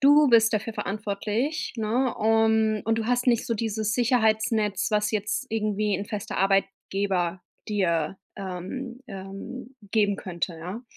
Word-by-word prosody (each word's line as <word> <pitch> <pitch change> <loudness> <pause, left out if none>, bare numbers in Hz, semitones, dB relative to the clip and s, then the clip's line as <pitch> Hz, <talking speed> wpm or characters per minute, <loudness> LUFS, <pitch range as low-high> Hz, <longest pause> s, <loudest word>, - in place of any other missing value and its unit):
Du 290 +1 +7
bist 225 -1 +6
dafür 220 +1 -1
verantwortlich, 210 +7 -2
ne? 235 +3 0
Un 220 -1 +3
und 225 +1 +1
du 220 - -2
hast 245 +1 +1
nicht 235 -2 +3
so 230 - 0
dieses 220 -1 -1
Sicherheitsnetz, 220 -4 +2
was 210 0 +2
jetzt 210 +5 -1
irgendwie 210 -2 0
'n 200 - -4
fester 205 -1 -5
Arbeitgeber 195 -2 0 0.3
dir, 185 -5 0 0.2
ähm, 195 +7 -6
ähm, 200 +7 -8 0.2
geben 205 -3 +2
könnte, 175 -2 -3
ja? 185 +8 -6
215 Hz, 135 wpm, -26 LUFS, 195-230 Hz, 0.3 s, Du